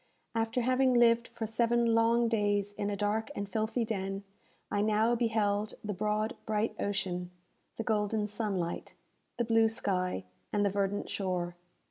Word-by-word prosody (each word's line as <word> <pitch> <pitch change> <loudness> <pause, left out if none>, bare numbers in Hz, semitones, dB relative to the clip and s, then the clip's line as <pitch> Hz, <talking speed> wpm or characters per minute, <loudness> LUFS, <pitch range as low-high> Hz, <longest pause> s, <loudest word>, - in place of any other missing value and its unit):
After 225 +2 0
having 255 +1 +3
lived 235 -1 +5
for 230 -1 -5
seven 235 +1 +2
long 230 +1 +4
days 205 -2 +1
in 205 0 -2
a 205 - -1
dark 210 +3 0
and 200 - -3
filthy 220 +4 -1
den, 195 -2 -3 0.5
I 205 - +1
now 215 +2 +3
beheld 215 -3 +1
the 210 -1 -2
broad 210 +2 -1
bright 215 +1 0
ocean, 180 -3 -2 0.5
the 225 - -2
golden 210 -1 +1
sunlight, 205 -5 -3 0.4
the 240 - +1
blue 225 0 +4
sky, 185 - -1 0.3
and 205 -1 +2
the 200 - +2
verdant 200 0 -1
shore! 180 -3 -2
215 Hz, 150 wpm, -31 LUFS, 200-230 Hz, 0.5 s, lived